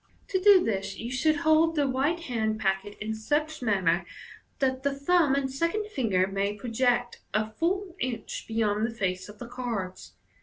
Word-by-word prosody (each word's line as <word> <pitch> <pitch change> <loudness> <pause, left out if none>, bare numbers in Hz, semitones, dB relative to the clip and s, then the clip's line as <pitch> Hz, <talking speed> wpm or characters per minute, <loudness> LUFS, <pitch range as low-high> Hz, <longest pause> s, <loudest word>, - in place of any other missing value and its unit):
To 375 -1 0
do 395 -2 +7
this 195 -2 -2
you 235 +2 -5
should 310 +5 +2
hold 320 +1 +4
the 290 -2 +2
right 275 +6 +1
hand 220 -8 -1
packet 195 +1 -1
in 215 +1 -3
such 295 +8 -1
manner 190 -6 +2 0.5
that 260 -1 0
the 280 0 0
thumb 290 0 +3
and 270 -1 -1
second 335 +9 -1
finger 205 - +2
may 195 +1 -1
project 240 +2 0 0.2
a 215 0 0
full 360 - -1
inch 240 -4 -4
beyond 215 -2 0
the 230 - -7
face 185 -3 -2
of 210 - -11
the 240 - -8
cards. 235 -7 -5
245 Hz, 175 wpm, -28 LUFS, 210-300 Hz, 0.5 s, do